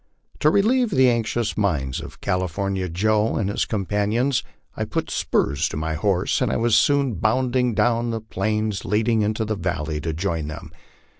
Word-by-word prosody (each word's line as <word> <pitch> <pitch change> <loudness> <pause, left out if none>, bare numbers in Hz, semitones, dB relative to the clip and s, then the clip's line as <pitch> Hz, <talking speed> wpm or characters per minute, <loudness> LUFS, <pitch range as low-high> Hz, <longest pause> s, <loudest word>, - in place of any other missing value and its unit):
To 150 - +4
relieve 230 +7 +3
the 130 -8 +4
anxious 115 -1 -1
minds 75 -11 -1
of - - -11
California 95 +1 -1
Joe 105 +5 +1
and 100 -2 0
his - - 0
com 100 -4 -2
panions, 110 +7 +1 0.3
I - - -2
put - - -3
spurs 70 -1 0
to - - -5
my 80 +1 -2
horse 90 +3 0
and - - +1
was 115 -1 +3
soon 140 -3 +3
bounding 125 +4 +1
down 120 +1 +2
the 115 -1 -2
plains 110 0 -2
lead 110 +2 0
ing 115 -2 +3
into 110 +1 0
the 110 0 -2
valley 80 -5 -3
to 80 - -2
join 80 -2 -2
him. 75 - -8
105 Hz, 175 wpm, -23 LUFS, 90-120 Hz, 0.3 s, To